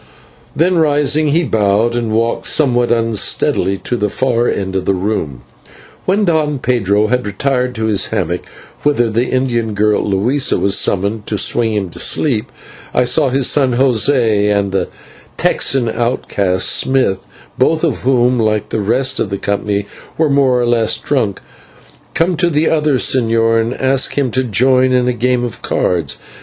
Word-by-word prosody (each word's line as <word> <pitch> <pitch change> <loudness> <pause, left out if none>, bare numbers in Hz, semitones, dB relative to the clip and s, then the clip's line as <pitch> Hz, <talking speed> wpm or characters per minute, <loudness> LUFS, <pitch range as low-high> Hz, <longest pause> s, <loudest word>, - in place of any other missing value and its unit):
Then 175 +2 +2
rising, 150 0 +2
he 160 +4 +2
bowed 110 -2 +1
and 120 -2 -2
walked 115 +2 0
somewhat 120 -5 +2
unsteadily 115 -3 +1
to 125 - -2
the 105 -3 -1
far 120 +1 0
end 95 -1 -3
of 95 -1 -2
the 95 - +1
room. 90 - -3 0.6
When 200 +3 +1
Don 155 -4 0
Pedro 105 -5 0
had 125 +3 0
retired 125 +5 -2
to 110 -1 -2
his 105 -3 +1
hammock, - - -2 0.4
whither 120 -6 +1
the 115 +3 0
Indian 120 -4 -1
girl, 105 +1 +1
Luisa, 110 +8 +1
was 100 0 +1
summoned 100 +3 -1
to 105 - -2
swing 115 +1 +1
him 100 -3 -2
to - - -10
sleep, 120 -9 0 0.4
I 125 - +3
saw 130 +3 +2
his 130 0 +1
son 130 -4 +1
José 120 -4 +2
and 100 -1 0
the 95 - -1 0.5
Texan 130 -3 +1
outcast, 105 -6 -1
Smith, 130 -8 +1 0.4
both - - +1
of - - 0
whom, 125 -1 +1
like 110 -2 0
the 110 - -2
rest 125 +6 0
of 105 - -1
the 100 - -3
company, 100 0 -2 0.3
were 155 -2 +1
more 135 -3 +2
or 120 - 0
less 115 -2 +1
drunk, 115 -9 -2 0.7
come 175 +2 +1
to 175 -1 +2
the 155 0 +1
señor 120 -7 +1
and 115 +3 -3
ask 135 +1 0
him 135 -4 0
to 130 +2 0
join 130 +3 +2
in 125 -1 +1
a 125 - +1
game 125 +1 0
of 120 -3 -6
cards. 85 -6 -1
120 Hz, 165 wpm, -15 LUFS, 105-130 Hz, 0.7 s, I